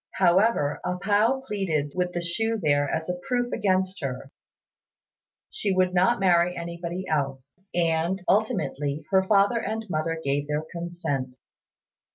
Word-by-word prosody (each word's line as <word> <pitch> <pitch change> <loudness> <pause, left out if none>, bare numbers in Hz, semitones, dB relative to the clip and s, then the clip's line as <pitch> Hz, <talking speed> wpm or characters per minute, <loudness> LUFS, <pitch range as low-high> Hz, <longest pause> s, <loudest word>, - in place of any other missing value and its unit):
However, 185 -4 +3
A 180 0 -2
pao 215 +7 +2
pleaded 165 - -1
that - - -20
with 180 -1 -1
the 175 - -2
shoe 225 +7 0
there 145 -4 +2
as 160 0 -2
a 180 0 -3
proof 245 -2 0
against 190 -1 0
her, 135 0 -5 1.2
she 210 - -1
would 185 -1 +2
not 185 +7 +3
marry 180 -2 +3
anybody 170 +2 -5
else; 140 -3 -2 0.2
and, 170 +2 +1
ultimately, 150 -8 0
her 190 -1 +5
father 200 +3 +3
and 225 0 -3
mother 160 +1 -1
gave 140 +1 0
their 150 +1 -1
consent. 170 -7 -4
175 Hz, 145 wpm, -26 LUFS, 150-195 Hz, 1.2 s, her